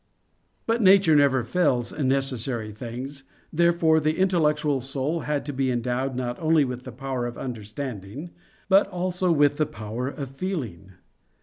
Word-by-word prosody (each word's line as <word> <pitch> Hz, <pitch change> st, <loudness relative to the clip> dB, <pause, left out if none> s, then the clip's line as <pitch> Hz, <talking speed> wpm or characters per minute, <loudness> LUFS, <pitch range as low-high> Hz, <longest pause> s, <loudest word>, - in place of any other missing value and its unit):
But 230 Hz, +1 st, +1 dB
nature 190 Hz, -5 st, +6 dB
never 140 Hz, -3 st, +4 dB
fails 125 Hz, -4 st, +1 dB
in 145 Hz, -3 st, -1 dB
necessary 130 Hz, -4 st, -1 dB
things: 125 Hz, +5 st, -7 dB, 0.3 s
therefore 170 Hz, -1 st, +4 dB
the 155 Hz, +1 st, 0 dB
intellectual 150 Hz, -6 st, +2 dB
soul 135 Hz, +5 st, -1 dB
had 150 Hz, -2 st, -2 dB
to 145 Hz, -, -4 dB
be 135 Hz, 0 st, 0 dB
endowed 125 Hz, +2 st, -1 dB
not 120 Hz, -1 st, -3 dB
only 160 Hz, -2 st, +3 dB
with 125 Hz, 0 st, -6 dB
the 130 Hz, -, -7 dB
power 130 Hz, 0 st, -3 dB
of 120 Hz, -, -7 dB
understanding, 120 Hz, -, -6 dB, 0.4 s
but 195 Hz, +1 st, +5 dB
also 180 Hz, -1 st, -1 dB
with 145 Hz, -2 st, +3 dB
the 155 Hz, -1 st, +1 dB
power 110 Hz, +4 st, -5 dB
of 140 Hz, -1 st, -5 dB
feeling. 135 Hz, -, -5 dB
135 Hz, 150 wpm, -25 LUFS, 125-160 Hz, 0.4 s, nature